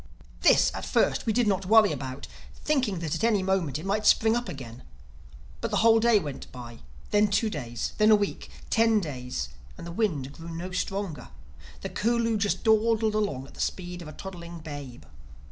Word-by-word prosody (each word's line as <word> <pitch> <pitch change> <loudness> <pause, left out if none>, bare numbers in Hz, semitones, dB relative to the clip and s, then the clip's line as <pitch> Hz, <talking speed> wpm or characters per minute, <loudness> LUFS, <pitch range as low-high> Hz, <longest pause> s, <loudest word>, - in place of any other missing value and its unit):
This, - - +5
at - - -5
first, - - +1
we - - +3
did 240 -1 +2
not 195 -2 0
worry 215 -2 +6
about, 130 - -5 0.3
thinking 260 -10 0
that 160 -3 -2
at - - -3
any 215 -4 +3
moment 185 -8 0
it 155 - -8
might 210 +2 0
spring 220 +1 +5
up 240 0 -2
again. 125 -3 -8 0.8
But - - -2
the - - 0
whole 225 0 +7
day 235 -1 +4
went 145 -8 -5
by; 120 -2 -10 0.3
then 210 0 +4
two 210 +2 +1
days; 120 - -4
then 215 0 +5
a 215 - +8
week,—ten 220 +2 0
days, 125 - -4 0.3
and - - -9
the 170 - -6
wind 160 - -1
grew 165 +2 -10
no 180 +3 -5
stronger. 185 - -3 0.5
The - - -4
Curlew 230 0 +1
just 205 -1 -1
dawdled 220 0 +3
along 200 -12 -1
at - - -15
the - - -7
speed 180 -1 -3
of 165 - -9
a - - -7
toddling 170 -3 -8
babe. 145 -5 -8
190 Hz, 190 wpm, -27 LUFS, 145-220 Hz, 0.8 s, a